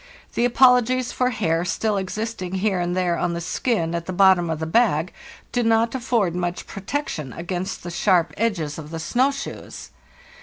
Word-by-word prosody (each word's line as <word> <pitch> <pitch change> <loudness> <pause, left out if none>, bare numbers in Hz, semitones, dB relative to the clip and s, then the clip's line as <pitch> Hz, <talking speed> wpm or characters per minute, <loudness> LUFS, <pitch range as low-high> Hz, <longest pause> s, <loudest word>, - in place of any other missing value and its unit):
The 240 - +1
apologies 250 0 +4
for 250 0 +1
hair 170 -8 0
still 210 +4 0
ex 190 +2 -5
isting 215 -5 -4
here 190 -1 0
and 175 +1 -1
there 175 -2 +1
on 175 -1 0
the - - -3
skin 170 -1 -1
at 170 -1 -3
the - - -2
bottom 185 -2 +4
of 160 - -1
the 160 - -3
bag 175 -3 +2 0.4
do 245 - +1
not 225 0 +2
afford 235 -8 0
much 175 0 -3
protection 195 - -4
against 180 +2 -4
the 175 - -6
sharp 175 -1 +2
edges 170 -10 -1
of 150 -1 -9
the 165 - -5
snow 245 - +2
shoes. 275 0 -7
185 Hz, 185 wpm, -23 LUFS, 170-230 Hz, 0.4 s, apologies